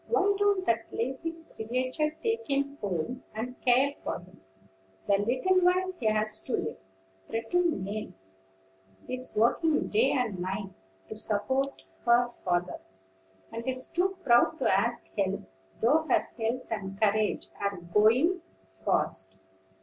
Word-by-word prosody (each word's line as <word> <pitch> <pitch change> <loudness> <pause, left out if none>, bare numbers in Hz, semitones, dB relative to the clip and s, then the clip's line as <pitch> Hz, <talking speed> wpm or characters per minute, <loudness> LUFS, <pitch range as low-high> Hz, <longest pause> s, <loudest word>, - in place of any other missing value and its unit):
Why 405 -3 +3
don't 405 -2 +3
that 230 0 +1
lazy 265 +8 -2 0.2
creature 255 +7 -1
take 455 0 0
him 280 0 0
home, 205 +6 -2
and 245 +3 -5
care 260 +3 +4
for - - -2
him, 180 +1 -16 0.6
the 200 - +4
little 255 - +2
while 370 +1 +3
he 230 - 0
has 215 0 +1
to 255 - -4
live? - - -1 0.5
Pretty 225 +10 0
Nell 215 - -1 1.0
is 255 -2 -4
working 300 +8 +3
day 445 +3 +4
and 235 -8 0
night, 195 +2 -3 0.4
to - - -5
support 260 +6 -1 0.2
her 240 0 +5
father, 180 -6 -2 0.7
and 230 +2 -6
is 255 0 -2
too 375 +2 +1
proud 245 +5 +4
to 190 - +3
ask 235 +4 0
help, 195 0 +1 0.4
though 315 +7 +3
her - - +2
health 235 +2 -2
and 195 -3 -4
courage 215 0 +2 0.2
are 200 -1 -1
going 220 - +3 0.4
fast. 95 0 0
240 Hz, 135 wpm, -29 LUFS, 210-290 Hz, 1.0 s, her